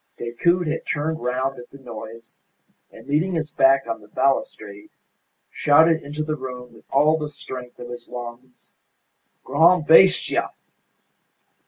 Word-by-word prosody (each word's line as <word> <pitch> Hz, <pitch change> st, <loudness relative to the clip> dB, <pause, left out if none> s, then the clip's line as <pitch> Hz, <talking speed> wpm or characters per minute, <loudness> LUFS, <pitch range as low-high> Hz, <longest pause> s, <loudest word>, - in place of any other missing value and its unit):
Decoud 170 Hz, +10 st, 0 dB
had 155 Hz, +1 st, -3 dB
turned 160 Hz, +1 st, -2 dB
round 130 Hz, +2 st, -2 dB
at 120 Hz, -, -12 dB
the 140 Hz, -, -14 dB
noise, 115 Hz, -3 st, -11 dB, 0.5 s
and, -, -, -15 dB
leaning 160 Hz, +6 st, 0 dB
his 155 Hz, -2 st, -3 dB
back 135 Hz, 0 st, +3 dB
on 115 Hz, -2 st, -5 dB
the 105 Hz, -, -17 dB
balustrade, 105 Hz, -4 st, -2 dB, 0.6 s
shouted 160 Hz, +3 st, +4 dB
into 150 Hz, +2 st, -5 dB
the 155 Hz, 0 st, -2 dB
room 125 Hz, -3 st, -8 dB
with 110 Hz, -, -19 dB
all 150 Hz, +3 st, +3 dB
the 150 Hz, -1 st, -4 dB
strength 130 Hz, -4 st, -9 dB
of 120 Hz, -, -9 dB
his 120 Hz, -1 st, -9 dB
lungs, 120 Hz, +1 st, -10 dB, 0.7 s
"Gran' 160 Hz, +5 st, +4 dB
bestia!" 165 Hz, +5 st, +4 dB
135 Hz, 140 wpm, -22 LUFS, 120-155 Hz, 0.7 s, shouted